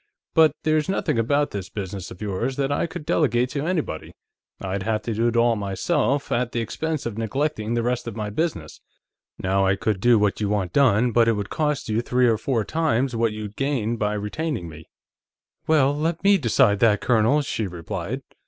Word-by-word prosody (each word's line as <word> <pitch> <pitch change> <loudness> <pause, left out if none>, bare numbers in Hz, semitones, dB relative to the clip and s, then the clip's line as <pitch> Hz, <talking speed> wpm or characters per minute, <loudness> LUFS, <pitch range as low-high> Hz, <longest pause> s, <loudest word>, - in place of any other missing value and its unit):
But 160 -1 +5
there's 155 +2 +1
nothing 190 -10 0
about 140 +6 +1
this 100 -2 -5
business 95 -2 -6
of 95 - -9
yours 105 +6 -2
that 140 0 -1
I 145 - 0
could 155 - -8
delegate 125 -6 +1
to 145 +2 -2
anybody; 160 - -2 0.5
I'd 95 0 -3
have 110 +1 -1
to 115 - -2
do 115 +2 +1
it 120 - -1
all 115 0 +4
myself, 135 - -1
at 120 0 0
the 120 - 0
expense 155 +6 -3
of 115 -2 -4
neglecting 115 -1 -1
the 120 - 0
rest 125 0 -1
of 115 - -5
my 105 -2 -4
business. 105 - -3 0.6
Now, 95 +1 +1
I 95 0 +3
could 100 0 -1
do 120 0 +5
what 105 0 +1
you 105 - 0
want 100 -4 -1
done, 125 -3 +4
but 115 0 +4
it 115 - +4
would 105 -2 -4
cost 150 -2 -1
you 110 +1 0
three 125 +1 +2
or 110 -2 +2
four 115 -2 0
times 135 -4 0
what 115 -1 +1
you'd 105 -1 -7
gain 130 -5 -1
by 105 -2 -1
retaining 105 - -3
me." 80 -1 -11 0.8
"Well, 145 -3 +3
let 160 +3 -2
me 200 0 +5
decide 115 -5 +3
that, 105 -2 +4
Colonel," 125 +5 +2
she 110 -6 -2
replied. 85 -3 -5
115 Hz, 200 wpm, -23 LUFS, 105-140 Hz, 0.8 s, But